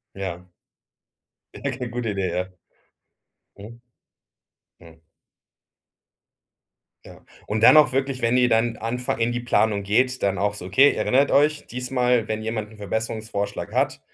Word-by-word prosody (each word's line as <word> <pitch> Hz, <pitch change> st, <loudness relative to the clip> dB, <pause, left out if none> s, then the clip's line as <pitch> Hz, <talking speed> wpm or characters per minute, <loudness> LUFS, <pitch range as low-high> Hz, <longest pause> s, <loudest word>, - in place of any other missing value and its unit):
Ja. 90 Hz, -2 st, -6 dB, 1.1 s
Ja, 140 Hz, -, -4 dB
g 125 Hz, -1 st, -5 dB
gute 120 Hz, -2 st, -3 dB
Idee, 100 Hz, -2 st, -2 dB
ja. 90 Hz, +1 st, -3 dB, 1.1 s
Mhm. 115 Hz, +4 st, -12 dB, 1.0 s
Mhm. 80 Hz, -1 st, -18 dB, 2.0 s
Ja, -, -, -14 dB, 0.3 s
und 110 Hz, +1 st, -2 dB
dann -, -, +8 dB
auch 150 Hz, -3 st, +6 dB
wirklich, 135 Hz, -1 st, -2 dB
wenn 115 Hz, +1 st, +2 dB
ihr 125 Hz, -1 st, +4 dB
dann 115 Hz, 0 st, +1 dB
anfangt 120 Hz, +1 st, -3 dB
in 115 Hz, +1 st, +1 dB
die 120 Hz, -, -3 dB
Planung 110 Hz, -4 st, +1 dB
geht, 125 Hz, +6 st, 0 dB
dann 100 Hz, -1 st, 0 dB
auch 105 Hz, 0 st, 0 dB
so: 90 Hz, -3 st, -8 dB
„Okay, 135 Hz, +10 st, +5 dB
erinnert 135 Hz, +2 st, +1 dB
euch: 150 Hz, +1 st, +2 dB
Diesmal, 125 Hz, -2 st, 0 dB
wenn 110 Hz, 0 st, -3 dB
jemand 110 Hz, -1 st, -4 dB
'n 110 Hz, -, -15 dB
Verbesserungsvorschlag 105 Hz, 0 st, -4 dB
hat, -, -, 0 dB
115 Hz, 140 wpm, -23 LUFS, 105-125 Hz, 2.0 s, dann